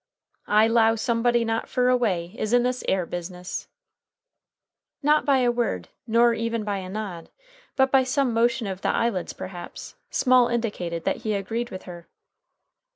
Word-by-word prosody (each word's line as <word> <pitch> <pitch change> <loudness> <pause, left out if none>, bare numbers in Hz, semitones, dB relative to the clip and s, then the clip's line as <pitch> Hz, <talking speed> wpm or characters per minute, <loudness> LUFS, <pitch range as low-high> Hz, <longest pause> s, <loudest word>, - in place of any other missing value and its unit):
"I 215 +1 +5
'low 225 -1 +4
somebody 235 +1 +1
not 225 0 -2
fur 250 -1 +2
away 195 -8 +1
is 215 +1 -2
in 245 0 +5
this 250 0 -1
'ere 190 -2 +1
business!" 180 +1 -6 1.4
Not 300 +1 +3
by 275 -2 +3
a 245 -1 +3
word, 235 - -2 0.2
nor 235 +1 +4
even 230 -1 -2
by 205 -1 -2
a 185 -1 -7
nod, 190 -5 -6 0.5
but 265 0 +3
by 270 -1 +5
some 255 -1 0
motion 235 +1 +2
of 190 -1 -5
the - - 0
eyelids, 215 -7 0
perhaps, 180 -2 -8 0.2
Small 255 -2 +4
indicated 195 -9 -2
that - - 0
he 215 -1 -2
agreed 225 +5 -3
with 185 - -8
her. 175 -2 -10
230 Hz, 160 wpm, -25 LUFS, 190-240 Hz, 1.4 s, I